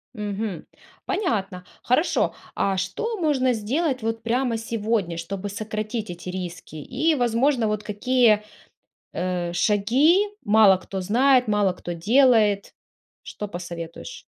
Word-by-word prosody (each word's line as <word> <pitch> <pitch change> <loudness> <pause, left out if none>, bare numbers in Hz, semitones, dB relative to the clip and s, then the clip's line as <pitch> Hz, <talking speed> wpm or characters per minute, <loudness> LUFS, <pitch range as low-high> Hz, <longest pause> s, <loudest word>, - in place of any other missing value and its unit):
Мгм. 210 -2 -4 0.4
Понятно, 210 - -2 0.2
хорошо. 280 +8 +1 0.2
А 195 -1 0
что 410 - -3
можно 275 -7 +1
сделать 255 +5 -1
вот 225 0 -3
прямо 240 0 0
сегодня, 220 -6 -2
чтобы 195 +4 -5
сократить 215 +1 -4
эти 175 +1 -7
риски 180 -3 -7
и, 275 - 0
возможно, 245 -1 +1
вот 210 0 -2
какие, 215 0 +2 0.7
э, 180 -1 -2
шаги 245 - +3 0.2
мало 205 -2 +6
кто 190 +1 -6
знает, 250 +5 +3
мало 205 -2 +2
кто 175 -1 -7
делает? 215 +1 +3 0.5
Что 210 - -7
посоветуешь? 170 - -8
215 Hz, 115 wpm, -24 LUFS, 190-250 Hz, 0.7 s, мало